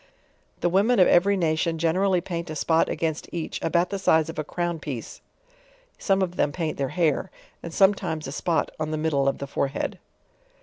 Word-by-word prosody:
The 175 - +2
women 205 +7 +3
of 185 - +6
every 200 +3 +4
nation 165 -1 0
generally 180 +3 +2
paint 170 -1 -5
a 155 - -5
spot 160 +1 +2
against 160 -2 -2
each 165 -2 -4
about 170 +3 +1
the 200 - -2
size 160 -4 +3
of 165 - -6
a - - -1
crown 175 +2 -3
piece, 135 -7 -7 0.8
some 195 -1 +2
of 180 -1 -4
them 145 - +2
paint 160 -2 -3
their 135 -1 0
hair, 170 +1 0 0.3
and 170 - -7
sometimes 175 -5 +2
a - - -5
Bpot 165 +3 0
on 155 0 -2
the 155 - -2
middle 150 -3 +1
of 135 - +1
the 140 - -5
fore 140 0 -1
head. 135 - -4
165 Hz, 200 wpm, -25 LUFS, 155-180 Hz, 0.8 s, of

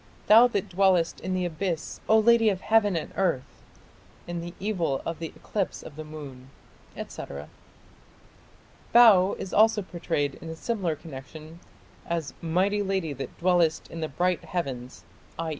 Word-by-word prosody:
Thou 225 +3 +8
that 205 -4 -2
dwellest 185 -2 +2
in 185 +1 -3
the 180 -1 0
Abyss, 170 -1 -3
O 220 - +7
lady 225 0 +5
of 190 -2 -2
heaven 215 -3 +3
and 160 - -4
earth!... 165 -9 -1 0.6
In 175 -1 -4
the 175 +1 -8
evil 180 -9 -1
of 165 -1 -4
the 165 - -3
eclipse 200 -3 -3
of 145 - -11
the 155 - -6
moon, 140 -4 -10 0.5
etc. 70 +2 -7 1.4
Bau 210 -6 +7
is 185 - -6
also 215 0 +4
prayed 165 -6 -2
in 165 - -7
a 160 - -5
similar 185 -3 -2
connection 155 +2 -11 0.5
as 165 -4 -3
"mighty 185 +5 +1
lady 190 -6 -1
that 135 0 -7
dwellest 175 -3 +2
in 165 - -6
the 155 -1 -3
bright 180 +4 0
heavens", 130 -8 -5 0.3
i. 165 0 -3
175 Hz, 155 wpm, -26 LUFS, 155-195 Hz, 1.4 s, Thou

